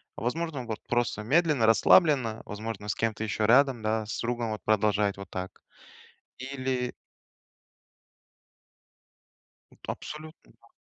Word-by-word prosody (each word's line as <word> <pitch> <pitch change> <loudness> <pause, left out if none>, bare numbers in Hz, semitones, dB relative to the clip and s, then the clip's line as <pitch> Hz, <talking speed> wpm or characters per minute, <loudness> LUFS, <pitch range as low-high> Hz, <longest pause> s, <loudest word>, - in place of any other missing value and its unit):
Возможно, 140 +2 -3
вот, 110 -2 -4
просто 120 -3 0
медленно, 150 -1 +3
расслабленно, 115 - +4
возможно, 105 0 -6
с 105 - -1
кем-то 110 -1 -1
еще 105 0 -1
рядом, 130 -1 +4
да, 110 0 -1
с 105 - -4
другом 120 -1 -2
вот 110 - -5
продолжать 105 -2 +2
вот 100 - -9
так. 95 0 -6 0.8
Или 130 -1 -3 2.8
Это - - -7
абсолютно, 155 +1 -10
да. 115 - -23
115 Hz, 115 wpm, -28 LUFS, 110-130 Hz, 2.8 s, расслабленно